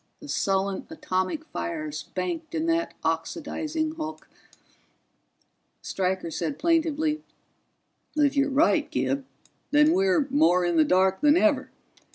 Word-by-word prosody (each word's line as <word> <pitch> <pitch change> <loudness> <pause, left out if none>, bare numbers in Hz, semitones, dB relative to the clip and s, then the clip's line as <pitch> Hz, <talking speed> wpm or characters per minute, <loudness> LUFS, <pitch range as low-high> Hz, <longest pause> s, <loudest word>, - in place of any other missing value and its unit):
The 295 - -11
sullen 195 -6 -1
atomic 295 0 -2
fires 310 -2 -4
banked 335 -3 -3
in 320 0 0
that 335 0 0
oxidizing 310 - -2
hulk 315 -1 -6 1.6
Stryker 185 -2 -2
said 280 - -3
plaintively, 315 -2 +1 0.9
"If 295 -2 +2
you're 280 0 +2
right, 300 +2 +3
Gib, 130 +1 -1 0.4
then 300 +2 +5
we're 370 -5 +3
more 180 - +4
in 175 -1 +1
the 160 - +6
dark 185 +3 +2
than 295 +2 +5
ever. 290 -6 +2
295 Hz, 120 wpm, -26 LUFS, 190-320 Hz, 1.6 s, the